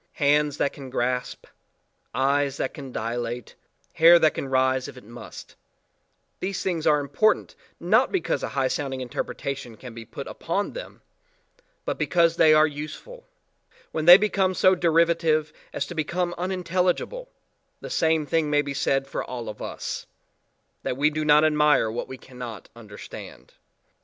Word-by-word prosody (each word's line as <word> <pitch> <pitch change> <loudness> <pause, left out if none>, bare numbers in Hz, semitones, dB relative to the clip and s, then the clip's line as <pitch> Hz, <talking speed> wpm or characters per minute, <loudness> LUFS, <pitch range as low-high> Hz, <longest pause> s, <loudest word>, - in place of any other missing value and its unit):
Hands 145 0 +2
that 140 - 0
can 135 -2 -9
grasp, 125 0 -2 0.7
eyes 140 +1 +1
that 130 - -2
can 135 -3 -9
dilate, 120 +1 -4 0.4
hair 170 +2 +7
that 155 -3 +3
can - - -4
rise 130 0 +1
if - - -11
it 125 - -12
must, 120 +3 -11 0.8
these 190 +1 -3
things 170 -4 -1
are 150 -1 +4
important 145 +10 +1 0.3
not - - +3
because 380 - -1
a - - -3
high 135 -1 +2
sounding 135 -1 -3
interpretation 125 -1 -5
can 125 0 -10
be 115 0 -8
put 135 +5 -8
upon 195 +5 -3
them - - -9 0.8
but - - -3
because 170 -1 +2
they 160 -1 +6
are 155 0 +6
useful; 155 - -8 0.6
when 155 -1 -2
they 175 +2 +11
become 195 -3 +1
so 185 +1 +5
derivative 165 -3 +2 0.2
as - - -2
to - - -8
become 175 +2 -1
unintelligible/the 185 - -3
same 160 -1 +2
thing 155 0 0
may 145 0 +2
be 140 -1 -4
said 135 0 0
for - - -4
all 120 -2 -6
of 105 - -9
us - - -5 0.7
that 125 - -3
we 150 +2 +3
do 155 +1 -2
not 150 0 +5
admire 150 -6 +3
what 120 - -4
we 130 - -8
cannot 125 -5 -9
understand. 105 -3 -11
150 Hz, 155 wpm, -25 LUFS, 130-170 Hz, 0.8 s, they